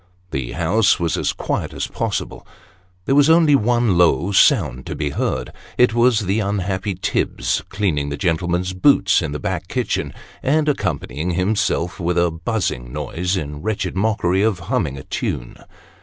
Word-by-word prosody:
The 65 -3 -3
house 95 +6 +2
was 85 -2 0
as - - 0
quiet - - -3
as - - -2
possible. - - -4 0.6
There - - +1
was 145 +2 +5
only 160 -2 +5
one 120 -6 +2
low 90 +2 +3
sound 85 - +3
to - - -4
be 75 -1 -2
heard 65 -2 -2 0.2
it 125 -2 +4
was 120 -1 +3
the 100 +2 0
unhappy 100 -1 -2
Tibbs 90 - -1
cleaning 90 -8 -1
the 70 - -4
gentlemen's 90 +3 -1
boots 95 -1 +4
in 75 -4 -3
the 75 - -3
back 90 +2 -3
kitchen, 125 +4 -2 0.3
and 150 +3 +1
accompanying 85 - -2
himself 90 -2 0
with 90 0 -1
a 85 -1 +3
buzzing 80 - -3
noise, 85 +6 -2
in 75 -3 -5
wretched 100 -3 -2
mockery 95 -2 +1
of 110 -3 +2
humming 85 - 0
a 65 - -8
tune. - - -4
95 Hz, 160 wpm, -20 LUFS, 80-110 Hz, 0.6 s, was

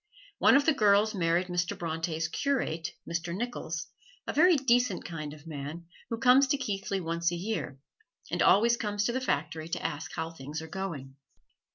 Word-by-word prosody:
One - - +6
of 280 0 +4
the 320 - +4
girls 210 -3 +4
married 175 -1 +1
Mr. 175 -1 -2
Bronte's 165 -1 -2
curate, 170 - -1
Mr. 170 +1 -3
Nicholls, 195 -7 -4 0.4
a - - -3
very 350 +4 +6
decent 245 - +2
kind 155 -4 -5
of 150 +1 -13
man 155 +2 -6 0.2
who 230 - -2
comes 255 +3 +6
to 285 - +2
Keighley 200 -5 -2
once 170 0 -1
a - - -2
year, 175 -7 -4 0.5
and - - 0
always 235 +4 +5
comes 205 -2 -1
to 235 - +1
the 260 +2 -2
factory 160 - -2
to - - -3
ask 150 -1 -3
how 160 0 -3
things 150 0 -6
are 160 - -7
going. 155 -7 -6
175 Hz, 180 wpm, -29 LUFS, 160-230 Hz, 0.5 s, One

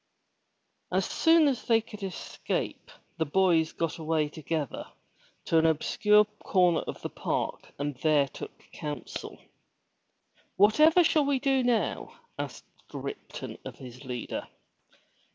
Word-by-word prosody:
As - - +1
soon 325 -2 +4
as 265 -4 -1
they 230 -2 +4
could 215 -2 -11
escape 190 -3 -4 0.3
the 160 - +2
boys 165 -1 +3
got 165 +1 -3
away 155 -1 0
together 155 -2 -4 0.6
to 165 - +4
an 160 - +4
obscure 210 +7 +4 0.2
corner 180 -4 +3
of - - -6
the - - -3
park - - -3
and 145 +1 -2
there 150 -1 +3
took 135 - -10
counsel. 150 -2 -6 1.2
"Whatever 305 - +6
shall 310 -3 +3
we 280 -1 +2
do 270 0 +2
now?*' 245 -2 0 0.2
asked - - -5 0.3
Ripton - - -7
of - - -8
his 125 0 -11
leader. 125 -3 -5
175 Hz, 125 wpm, -28 LUFS, 155-240 Hz, 1.2 s, Whatever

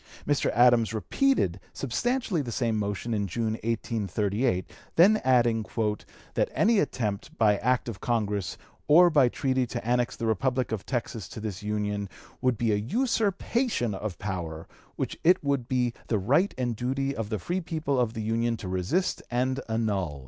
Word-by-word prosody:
Mr. 145 -1 +1
Adams 120 -2 +5
repeated 110 - +1
substantially 215 - -1
the 125 -4 -5
same 115 -2 0
motion 105 +2 -2
in 100 -2 0
June, 110 +4 -1
1838, 105 -2 -1 0.3
then 200 +6 +6
adding 120 -3 +3 0.7
"that - - +1
any 220 0 +4
attempt 105 - -2
by 105 -3 +4
act 125 +4 +1
of 115 -5 -6
Congress 105 -6 -1 0.3
or 175 +4 +7
by 140 -5 +5
treaty 130 -1 0
to 120 -1 -5
annex 120 0 +1
the 115 - -4
Republic 125 +2 0
of 110 -3 -4
Texas 115 -6 -3
to - - -8
this 105 -3 -5
Union 105 -1 -2 0.3
would 125 -3 +2
be 115 0 +1
an 105 +2 -1
usurpation 225 - 0
of 100 -1 -4
power 85 -5 -5 0.3
which - - -4
it 175 0 +4
would 140 -4 0
be 125 -2 +1
the 110 - +1
right 140 - +2
and 125 -2 0
the - - -4
duty 135 +3 -1
of 110 -2 -4
the 110 - -1
free 175 - -2
people 155 -5 -1
of 120 -2 +1
the 110 - -3
Union 115 +1 0
to 100 - -7
resist 95 - 0
and 130 +2 0
annul." 100 -10 -1
120 Hz, 170 wpm, -27 LUFS, 105-135 Hz, 0.7 s, or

